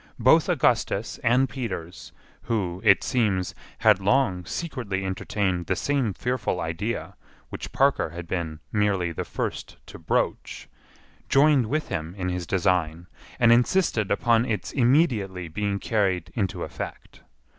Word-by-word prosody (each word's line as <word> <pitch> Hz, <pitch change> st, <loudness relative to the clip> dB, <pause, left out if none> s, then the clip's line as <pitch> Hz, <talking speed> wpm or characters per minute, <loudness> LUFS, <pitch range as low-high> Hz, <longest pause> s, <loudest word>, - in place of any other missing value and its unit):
Both -, -, +4 dB
Augustus 105 Hz, +4 st, +1 dB
and 125 Hz, +3 st, +3 dB
Peters, 115 Hz, -10 st, -6 dB, 0.3 s
who, 95 Hz, -6 st, -2 dB
it 100 Hz, -3 st, +5 dB
seems, 105 Hz, -7 st, 0 dB, 0.2 s
had 105 Hz, -3 st, +4 dB
long 95 Hz, -3 st, +1 dB
secretly 110 Hz, -, -4 dB
entertained 95 Hz, -2 st, -2 dB
the -, -, +1 dB
same 140 Hz, -6 st, 0 dB
fearful 125 Hz, -6 st, -2 dB
idea 85 Hz, +8 st, -3 dB, 0.3 s
which -, -, -7 dB
Parker 135 Hz, -, +2 dB
had 85 Hz, +1 st, -8 dB
been 80 Hz, -4 st, -4 dB
merely 100 Hz, -5 st, +1 dB
the 85 Hz, -, -4 dB
first -, -, -5 dB
to -, -, -11 dB
broach, -, -, -2 dB, 0.6 s
joined 140 Hz, -3 st, +4 dB
with 155 Hz, +5 st, -2 dB
him 80 Hz, +3 st, -4 dB
in 90 Hz, -2 st, -3 dB
his 90 Hz, -1 st, -3 dB
design 85 Hz, -3 st, 0 dB, 0.3 s
and 115 Hz, -1 st, +5 dB
insisted 120 Hz, -, +2 dB
upon 115 Hz, -1 st, +3 dB
its 115 Hz, -4 st, -3 dB
immediately 120 Hz, -, +2 dB
being 100 Hz, +5 st, -2 dB
carried 95 Hz, -5 st, 0 dB
into 100 Hz, -5 st, -2 dB
effect. -, -, -8 dB
100 Hz, 135 wpm, -25 LUFS, 90-120 Hz, 0.6 s, it